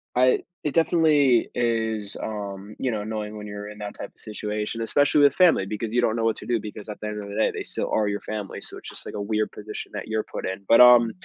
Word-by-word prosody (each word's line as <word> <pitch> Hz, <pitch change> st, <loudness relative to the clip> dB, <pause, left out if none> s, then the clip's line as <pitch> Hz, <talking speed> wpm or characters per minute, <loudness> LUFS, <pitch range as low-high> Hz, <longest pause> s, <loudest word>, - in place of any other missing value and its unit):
I 125 Hz, +1 st, +4 dB, 0.2 s
it 150 Hz, -, -1 dB
definitely 155 Hz, -7 st, +4 dB
is, 110 Hz, -3 st, -1 dB
um, 100 Hz, -1 st, -6 dB
you 130 Hz, -, 0 dB
know, 110 Hz, -2 st, -2 dB
annoying 105 Hz, 0 st, -4 dB
when 105 Hz, 0 st, -7 dB
you're 105 Hz, 0 st, -7 dB
in 105 Hz, -, -10 dB
that 105 Hz, -1 st, -5 dB
type -, -, -6 dB
of -, -, -25 dB
situation, 105 Hz, +1 st, -4 dB
especially 145 Hz, +5 st, +3 dB
with 140 Hz, -1 st, +6 dB
family 175 Hz, -, +4 dB
because 105 Hz, +2 st, -4 dB
you 120 Hz, -, +3 dB
don't 110 Hz, -2 st, +1 dB
know 115 Hz, -1 st, 0 dB
what 115 Hz, -, +2 dB
to -, -, -9 dB
do 120 Hz, -2 st, +1 dB
because 105 Hz, 0 st, -8 dB
at 105 Hz, -, -7 dB
the 105 Hz, -, -5 dB
end 105 Hz, 0 st, -4 dB
of 100 Hz, -, -9 dB
the 100 Hz, -, -7 dB
day, 110 Hz, -, +2 dB
they -, -, -4 dB
still -, -, -3 dB
are 110 Hz, -1 st, +2 dB
your 100 Hz, 0 st, -1 dB
family, 105 Hz, -2 st, -5 dB
so -, -, -9 dB
it's -, -, -8 dB
just, -, -, -8 dB
like, -, -, -7 dB
a 105 Hz, -, -3 dB
weird 105 Hz, +1 st, -1 dB
position 105 Hz, 0 st, -7 dB
that 105 Hz, -, -5 dB
you're 110 Hz, 0 st, -1 dB
put -, -, -4 dB
in, 95 Hz, +1 st, -5 dB
but, 115 Hz, -, +7 dB
um, 120 Hz, -2 st, +8 dB
110 Hz, 265 wpm, -25 LUFS, 105-120 Hz, 0.2 s, um